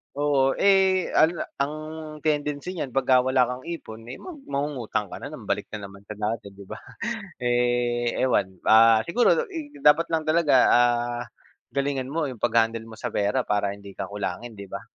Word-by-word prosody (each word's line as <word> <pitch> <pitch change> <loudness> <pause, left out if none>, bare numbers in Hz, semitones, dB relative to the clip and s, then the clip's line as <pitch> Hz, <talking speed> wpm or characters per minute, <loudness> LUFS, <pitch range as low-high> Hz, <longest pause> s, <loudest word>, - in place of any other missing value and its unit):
Oo. 140 -2 +2
Eh, 190 -2 +4
ano 160 +2 +5
na - - -1
ang 140 +2 -1 0.5
tendency 150 +3 -2
niyan 135 -6 -4
'pagka 130 -1 +3
wala 130 -1 +3
kang 125 +1 -5
ipon, 115 -10 -7
eh, - - -8
mag 360 -4 -9
mangungutang 140 -7 -2
ka - - -8
na - - -6
naman, - - -10
balik - - -2
na 105 -2 -6
naman 100 0 -15
sa 105 +1 -9
dati, 105 -1 -3
'di 100 -1 -13
ba? - - -7 0.6
Eh, 120 -1 +1
ewan, 95 -8 +1
ah, 115 0 +7
siguro 240 +8 +3
da 475 - +1
ig 300 -6 -8
dapat 165 - +4
lang 160 -1 0
talaga, 155 -2 +3
ah, 120 0 +2 0.5
galingan 140 -1 -2
mo 160 -2 -1
'yong 125 -4 -9
pag-handle 115 -1 +2
mo 115 -1 -12
sa 120 - -3
pera, 105 +6 0
para 100 -1 +1
hindi 100 -1 -11
ka - - -5
kulangin, 105 +2 -5
'di 100 - -8
ba. - - -7
125 Hz, 190 wpm, -25 LUFS, 110-150 Hz, 0.6 s, ah